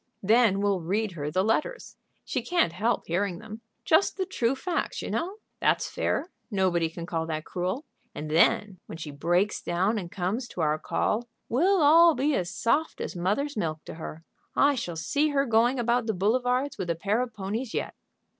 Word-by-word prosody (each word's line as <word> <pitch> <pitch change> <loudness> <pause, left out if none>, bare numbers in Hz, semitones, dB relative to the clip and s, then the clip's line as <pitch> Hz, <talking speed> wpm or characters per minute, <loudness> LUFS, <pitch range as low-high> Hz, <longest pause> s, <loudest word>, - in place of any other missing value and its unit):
"Then 215 -1 +4
we'll 200 -3 +1
read 205 +5 -1
her 150 -4 -4
the 185 +5 +1
letters. 305 - -1 0.3
She - - -2
can't 345 - +1
help 225 +6 0
hearing 180 +1 -1
them. 220 +2 -9 0.2
Just 400 - +3
the 380 - 0
true 260 -9 0
facts, 340 +6 -2
you - - -4
know. 365 +4 -2 0.2
That's - - +2
fair; 350 - -1 0.2
nobody 185 -5 +1
can 170 +1 -7
call 165 -2 -2
that 155 -1 -3
cruel. 185 - -3 0.3
And 150 0 -5
then, 200 +3 +3
when - - -7
she 155 -2 -6
breaks 175 +8 +1
down 190 +6 0
and 175 -3 -7
comes 205 +6 -2
to 180 - -5
our 155 0 +1
call, 235 +8 -1 0.2
we'll 350 +8 +3
all 330 +2 +7
be 285 +4 +1
as 180 -9 0
soft 255 - 0
as - - -4
mother's 210 +12 -1
milk 160 -6 -3
to - - -7
her. 160 0 -8 0.3
I 285 +1 +5
shall 180 -10 -4
see 285 - +1
her 280 -1 +2
going 235 +2 +3
about 240 0 +1
the 220 - 0
boulevards 250 +7 +1
with 180 -2 -3
a 170 - +1
pair 205 +7 0
of 245 -3 -4
ponies 215 +5 -4
yet." - - -2
210 Hz, 190 wpm, -27 LUFS, 175-255 Hz, 0.3 s, all